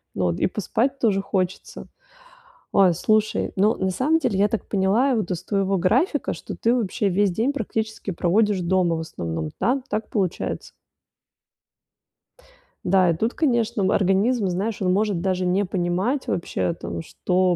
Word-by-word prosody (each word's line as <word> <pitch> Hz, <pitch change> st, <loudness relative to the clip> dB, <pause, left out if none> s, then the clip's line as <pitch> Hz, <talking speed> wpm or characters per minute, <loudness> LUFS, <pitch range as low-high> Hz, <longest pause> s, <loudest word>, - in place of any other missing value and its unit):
но 90 Hz, -, 0 dB
вот 85 Hz, -1 st, -1 dB
и -, -, +2 dB
поспать 230 Hz, +7 st, -1 dB
тоже 210 Hz, -6 st, +1 dB
хочется. 190 Hz, -2 st, -3 dB, 0.9 s
Ой, 190 Hz, -3 st, +5 dB
слушай, 215 Hz, +5 st, +1 dB
ну, 205 Hz, +3 st, +3 dB
на 190 Hz, 0 st, -1 dB
самом 280 Hz, -, +2 dB
деле, 195 Hz, -11 st, 0 dB
я 205 Hz, -, +5 dB
так 220 Hz, +1 st, -3 dB
поняла 210 Hz, +7 st, +2 dB
вот 215 Hz, -6 st, -2 dB
из 180 Hz, 0 st, -3 dB
твоего 195 Hz, 0 st, 0 dB
графика, 225 Hz, -, +1 dB
что -, -, -8 dB
ты 230 Hz, -, +1 dB
вообще 210 Hz, -3 st, -1 dB
весь 195 Hz, +1 st, +2 dB
день 230 Hz, +10 st, 0 dB
практически 220 Hz, -4 st, -3 dB
проводишь 195 Hz, +3 st, +1 dB
дома 175 Hz, -1 st, +1 dB
в 160 Hz, -, -3 dB
основном. 80 Hz, -, -5 dB
Да, 265 Hz, +3 st, +1 dB
так 215 Hz, +1 st, -3 dB
получается? 190 Hz, -5 st, -2 dB, 2.1 s
Да, 185 Hz, -1 st, +3 dB
и 165 Hz, -, +2 dB
тут, 225 Hz, +8 st, -1 dB
конечно, 235 Hz, -9 st, +1 dB
организм, 200 Hz, +4 st, +2 dB
знаешь, 195 Hz, +5 st, -2 dB
он 185 Hz, -1 st, +2 dB
может 205 Hz, -2 st, +1 dB
даже 185 Hz, 0 st, 0 dB
не 190 Hz, +3 st, +1 dB
понимать 190 Hz, +9 st, -1 dB
вообще, 170 Hz, 0 st, -1 dB
там, 165 Hz, -, -6 dB
что 180 Hz, +2 st, 0 dB
195 Hz, 155 wpm, -23 LUFS, 180-220 Hz, 2.1 s, Ой